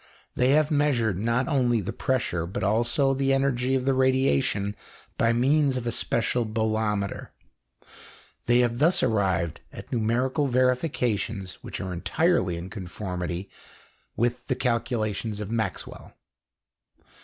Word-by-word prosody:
They 125 +1 +2
have 155 0 +3
measured 125 - +1
not 115 +4 0
only 125 -6 +2
the 95 - -4
pressure, 90 -10 -1
but 100 +3 -4
also 120 +7 +2
the 135 0 +1
energy 135 -1 +1
of 130 -1 -1
the 135 - +3
radiation 130 -6 +1 0.4
by 115 - +2
means 135 +3 +2
of 125 - -4
a 120 - 0
special 120 +2 0
bolometer. 110 -2 -1 1.2
They 120 +1 +5
have 120 -1 0
thus 165 +5 +3
arrived 95 -6 0
at - - -11
numerical 125 +5 +1
verifications 125 - 0
which - - -7
are 95 -2 -4
entirely 95 - +1
in 90 +3 -7
conformity 90 -2 -5 0.7
with 120 +1 -1
the 130 - 0
calculations 115 -3 -1
of 105 0 -5
Maxwell. 110 -5 -4
120 Hz, 130 wpm, -26 LUFS, 105-130 Hz, 1.2 s, They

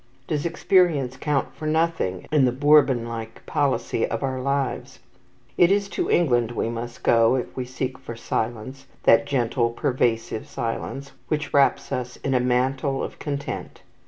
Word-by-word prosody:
Does 150 +1 -1
experience 165 -6 +2
count 145 0 -1
for 155 +2 -5
nothing 160 - 0
in 150 -3 +4
the 125 - +2
Bourbon 135 -3 +4
like 115 -1 -7
policy 130 -5 0
of 115 - -3
our 130 -1 -2
lives? 140 0 -2 0.6
It 175 +1 +6
is 200 0 +2
to - - -2
England 120 -9 +3
we 115 - -1
must 120 +1 -6
go 115 +1 +4
if 125 - -4
we 130 - -3
seek 130 +1 -4
for 120 -3 -8
silence, 120 +4 -4 0.2
that 115 +5 +5
gentle, 120 -3 +1
pervasive 115 -2 -1
silence 135 +4 -4 0.2
which 155 -2 -2
wraps 140 -1 +3
us 125 0 -3
in 135 - 0
a 125 - +3
mantle 130 +2 0
of - - -7
content. 140 -1 -5
130 Hz, 160 wpm, -24 LUFS, 120-145 Hz, 0.6 s, It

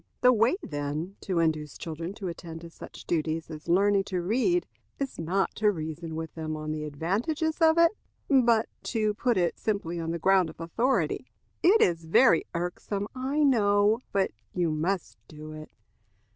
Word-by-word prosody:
The 250 0 +6
way, 230 +7 +3
then, 150 +5 -4
to 185 -3 -2
induce 155 -3 0
children 165 +3 -5
to 200 -4 -5
attend 165 -1 -7
to 170 -1 -10
such - - -11
duties 160 0 -1
as 155 +1 -9
learning 195 +3 +3
to 185 -3 -2
read, 255 - +1 0.3
is 275 -1 -4
not 185 +4 0
to 210 -1 +3
reason 160 -1 -5
with 160 0 -5
them 155 -1 -4
on 155 0 -4
the 155 0 -3
advantages 215 - -1
of 320 0 +5
it, 335 0 +6 0.4
but 235 -5 +4 0.2
to 215 -3 0
put 235 +1 0
it 175 -2 0
simply 185 -6 -2
on 165 0 -3
the 170 - -1
ground 185 0 +3
of 160 - -13
authority. 235 +11 0 0.3
"It 395 +6 +5
is 165 -2 +2
very 170 +1 +5
irksome, 195 +4 -3
I 270 +4 0
know, 210 -4 +4
but 195 -1 +1 0.2
you 175 -3 +1
must 170 +4 -2
do 155 0 -10
it. 155 0 -9
180 Hz, 170 wpm, -28 LUFS, 160-225 Hz, 0.4 s, The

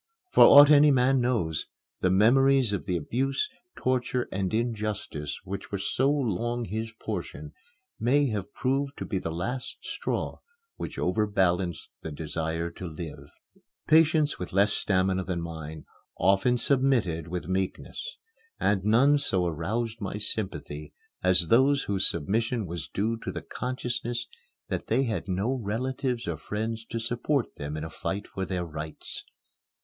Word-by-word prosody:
For - - +8
aught 145 +1 +10
any 150 0 +8
man 130 -1 +4
knows, 110 -11 0 0.3
the 90 - +2
memories 125 +4 +4
of 100 - -2
the 90 -2 +1
abuse, 135 - -1 0.3
torture, 125 -1 0
and 95 -1 -1
injustice 105 -10 -2
which 95 +1 -6
were 100 - -1
so 130 +7 +1
long 120 -3 0
his 110 +3 -4
portion - - -5 0.5
may 140 +5 +3
have 105 -4 -3
proved 140 +2 -1
to - - -4
be 95 - -1
the 85 - -4
last 120 +11 -3
straw - - -3 0.4
which - - -6
overbalanced 90 -4 +1
the 80 - -6
desire 80 +2 -3
to 90 +1 -7
live. 80 -1 -8 0.6
Patients 155 -1 +4
with 90 - -6
less 100 +2 +4
stamina 95 -1 +1
than 90 -2 -2
mine 80 -2 -7 0.3
often 100 +6 +3
submitted 120 - +1
with 90 +1 -4
meekness; 95 - -3 0.4
and 100 -2 +2
none 130 +8 +5
so 95 -10 +1
aroused 110 +8 -2
my 100 +1 -3
sympathy 95 -8 -3 0.3
as 90 -2 +3
those 135 +4 +4
whose 95 -2 +2
submission 110 - -1
was 85 -4 -5
due 110 +3 0
to - - -4
the - - -6
consciousness 120 -1 -3 0.4
that - - -3
they 125 +5 +2
had 115 -6 -2
no 100 +7 0
relatives 125 +1 -2
or 85 -2 -2
friends 110 +7 -3
to 115 0 -4
support 120 +4 -1
them 75 +1 -4
in 75 - -4
a 80 - -5
fight 100 +5 -4
for 95 - -4
their 90 -1 -2
rights. 75 -1 -7
105 Hz, 150 wpm, -28 LUFS, 90-125 Hz, 0.6 s, aught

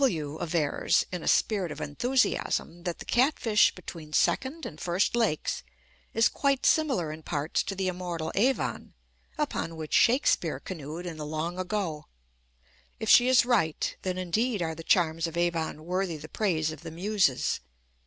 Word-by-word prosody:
W 155 - 0
avers, 160 -3 +1
in 180 -2 -4
a - - -6
spirit 195 -7 +2
of - - -7
enthusiasm, 200 - 0
that 175 -2 -2
the - - -9
Catfish 240 -4 +3
between 160 -4 -9
Second 285 - +1
and 155 - -8
First 180 +6 +1
Lakes 220 -10 0 0.5
is 225 0 +4
quite 275 -2 0
similar 260 - +2
in 155 +1 -8
parts 150 0 -1
to 195 - -4
the 190 0 -1
immortal 175 -3 -3
Avon, 255 +7 0 0.4
upon 285 - -2
which 155 -1 -6
Shakespeare 255 +4 +3
canoed 165 0 -7
in 170 -3 -6
the 150 - -5
long 160 +4 -3
ago. 180 -5 -3 0.9
If 220 - -3
she 245 - +7
is 255 -2 +5
right, 205 -11 +1
then 185 -1 -2
indeed 210 +6 0
are 160 -1 -2
the 165 - -8
charms 165 -1 +2
of 165 0 -6
Avon 165 -2 -1
worthy 180 -1 -1
the 150 +1 -9
praise 160 -4 0
of 155 - -9
the 165 - -7
Muses. 180 -4 +1
175 Hz, 165 wpm, -28 LUFS, 160-215 Hz, 0.9 s, she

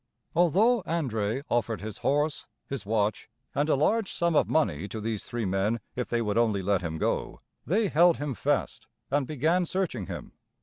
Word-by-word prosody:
Although 200 +8 +4
André 130 - -1
offered 115 -2 0
his 110 -1 -6
horse, 145 +2 0 0.2
his 130 -8 -5
watch, 105 -1 0 0.2
and 145 +2 0
a - - +4
large 200 +9 +1
sum 170 -1 0
of - - +3
money 100 - +1
to 110 - -6
these 110 -1 -3
three 120 -2 -3
men 95 +5 0 0.2
if 125 -1 -3
they 120 -1 +1
would 105 +1 +1
only 110 -5 +2
let 100 0 +2
him 80 -2 -3
go, - - -1 0.3
they 210 +6 +2
held 170 +1 +5
him 145 -2 -3
fast 110 - -1 0.2
and 140 -2 +1
began 160 +5 +1
searching 175 - -2
him. - - -7
125 Hz, 180 wpm, -28 LUFS, 105-165 Hz, 0.3 s, held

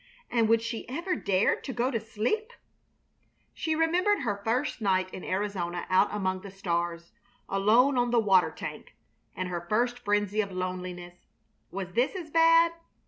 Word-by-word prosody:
And 230 -2 +2
would 225 0 +4
she 230 0 -5
ever 340 +7 -2
dare 195 - +2
to - - -7
go 250 +1 0
to 230 - 0
sleep? 230 - -2 1.0
She 320 -1 -1
remembered 350 +4 +2
her 205 -6 -2
first 245 +4 -1
night 185 -2 +1
in 185 - -7
Arizona 185 -3 -2
out 185 +2 +5
among 190 -2 -2
the 200 - -9
stars, 170 -3 -3 0.4
alone 230 +7 +3
on 245 0 +1
the 240 - +2
water 195 -4 +4
tank, - - -8 0.4
and 185 - -3
her 175 -1 -3
first 240 +3 +1
frenzy 205 -1 +1
of 200 -2 -5
loneliness. 180 -1 -6 0.4
Was 185 -2 -6
this 245 - +1
as 335 -5 -6
bad? 330 +1 +5
210 Hz, 160 wpm, -28 LUFS, 185-255 Hz, 1.0 s, out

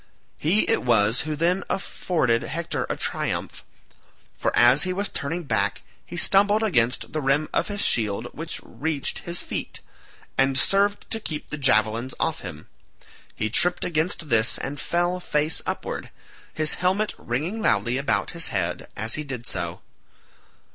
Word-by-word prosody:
He 180 +8 +2
it 225 - +2
was 115 -1 +3
who 155 - -1
then 175 +5 +1
afforded 155 -11 0
Hector 165 +1 -3
a - - -2
triumph, - - -3 0.7
for - - 0
as 120 +4 +7
he 185 - +2
was 200 +2 -1
turning 165 +5 -3
back 105 -7 0 0.2
he 175 - -8
stumbled 205 +5 +4
against 125 - +1
the 155 - -1
rim 140 +3 +2
of - - +1
his 205 -1 -1
shield 105 -4 +1
which 165 +1 -5
reached 150 -2 -3
his 170 0 -3
feet, - - -4 0.6
and 135 0 +4
served 200 +8 +3
to 225 - +1
keep 155 -8 -5
the 150 - -3
javelins 115 -1 +2
off 160 - 0
him. 75 -5 -9 0.7
He 110 -1 -2
tripped 180 +9 +3
against 160 -1 -1
this 115 -1 +3
and 140 +1 -4
fell 175 +3 0
face 150 -2 +2
upward, - - -4 0.4
his 155 -1 +1
helmet 190 +4 +1
ringing 155 - -3
loudly 120 - +2
about 140 - 0
his 165 -1 -2
head 90 -4 -2
as 110 +3 -1
he 155 - -1
did 130 -5 -6
so. - - -4
150 Hz, 155 wpm, -24 LUFS, 120-175 Hz, 0.7 s, as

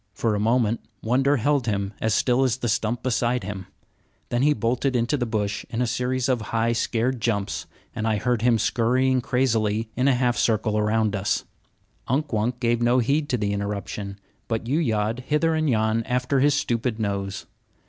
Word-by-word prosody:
For 115 -2 0
a 105 - 0
moment 115 +1 +1 0.2
wonder 135 +5 +2
held 140 0 +1
him 100 -1 -1
as 110 -1 +1
still 125 +1 +2
as 130 -1 +1
the 120 - -3
stump 110 +2 -1
beside 125 -2 0
him; 95 -1 -6 0.6
then 120 - 0
he 150 +2 +4
bolted 130 0 0
into 120 +4 +1
the 120 -4 -1
bush 105 -2 -2
in 115 - -3
a 125 - +2
series 125 +1 -1
of 125 -3 +1
high, 115 +2 0
scared 120 +1 -1
jumps, 100 -4 -1 0.3
and 110 - -2
I 110 -1 +1
heard 120 +1 0
him 120 -1 +4
scurrying 125 +4 +2
crazily 110 -4 0
in 130 +2 +1
a 135 - +4
half 125 -1 +1
circle 110 -1 +1
around 105 0 +1
us. 100 +1 0 0.6
Unk 140 +2 -1
Wunk 115 +3 0
gave 120 -1 +1
no 120 +1 +3
heed 145 +5 +1
to 125 - +1
the 100 -2 -1
interruption, 100 0 -4 0.3
but 115 -1 -2
yew 140 +7 +1
yawed 110 -5 0
hither 160 +2 +2
and 155 -1 +1
yon 110 -1 +2
after 125 +2 0
his 145 +1 +4
stupid 115 -4 -1
nose. 100 -2 -3
120 Hz, 190 wpm, -24 LUFS, 110-130 Hz, 0.6 s, he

